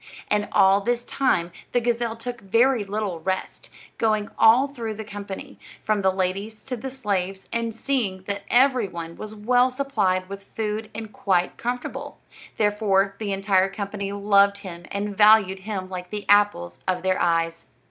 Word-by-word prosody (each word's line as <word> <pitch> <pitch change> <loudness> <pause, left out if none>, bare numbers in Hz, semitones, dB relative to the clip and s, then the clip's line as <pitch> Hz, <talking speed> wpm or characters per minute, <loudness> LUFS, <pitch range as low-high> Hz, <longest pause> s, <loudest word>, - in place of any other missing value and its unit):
And 210 0 +1
all 195 +1 +5
this 240 +2 -1
time 180 -11 +1 0.2
the 245 - +4
gazelle 235 -1 -1
took 240 0 -6
very 230 +4 +3
little 200 -3 -3
rest, 190 +3 -4 0.3
going 215 -2 +1
all 240 +5 +6
through 230 -6 -5
the 220 - -6
company, 200 -2 -8 0.2
from 215 -1 +1
the 190 -1 +3
ladies 195 +3 -3
to 260 - -3
the 265 +3 -6
slaves, 195 -7 -3
and 230 0 -1
seeing 225 -6 -2
that 200 +1 -4
every 255 -3 +4
one 170 -2 -7
was 215 0 -8
well 245 +4 +3
supplied 250 -9 0
with 200 +1 -7
food 215 +1 -4
and 220 -1 -7
quite 180 -2 +1
comfortable; 245 +1 -4 0.4
therefore 205 -2 +2
the 210 -2 -3
entire 195 -1 +2
company 200 0 -4
loved 200 0 +3
him 170 -2 -8
and 200 0 -3
valued 210 -2 +5
him 190 -1 -4
like 180 -1 -7
the 210 0 -5
apples 205 - +2
of 185 -1 0
their 185 0 +1
eyes. 165 0 0
205 Hz, 165 wpm, -24 LUFS, 190-225 Hz, 0.4 s, all